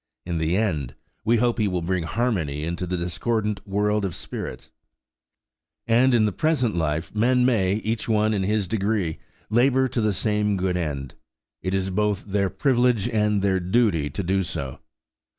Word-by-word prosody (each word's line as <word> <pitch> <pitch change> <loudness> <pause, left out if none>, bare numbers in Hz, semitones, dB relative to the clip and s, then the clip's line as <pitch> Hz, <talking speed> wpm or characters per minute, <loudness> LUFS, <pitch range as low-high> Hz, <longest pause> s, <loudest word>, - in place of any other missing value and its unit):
In 85 -2 -2
the 80 +3 +1
end, 80 - -1 0.3
we 115 +2 +3
hope 120 +1 +1
He 105 - +2
will 90 -3 -1
bring 90 -1 -1
harmony 80 - -1
into 85 +3 -3
the 90 +1 -1
discordant 105 +4 -1
world 105 +1 +1
of 95 -4 -2
spirits. - - -7 1.1
And 120 +2 +4
in 110 -2 +4
the 105 - +1
present 130 - +1
life 80 -1 -1
men 125 +4 +3
may, 100 -7 +2
each 110 +1 -2
one 110 0 +2
in 100 - 0
his 105 0 0
degree, 100 -4 -1 0.3
labour 130 +3 +3
to 120 - -1
the 110 -1 +2
same 105 +1 0
good 90 -1 0
end. 70 -6 -3 0.5
It 95 +1 -1
is 95 0 -1
both 105 0 0
their 100 -1 0
privilege 125 -5 +2
and 105 -2 +1
their 95 -1 +2
duty 90 -5 +1
to 95 - -4
do 95 +2 +1
so. 80 -7 -5
100 Hz, 170 wpm, -24 LUFS, 90-110 Hz, 1.1 s, And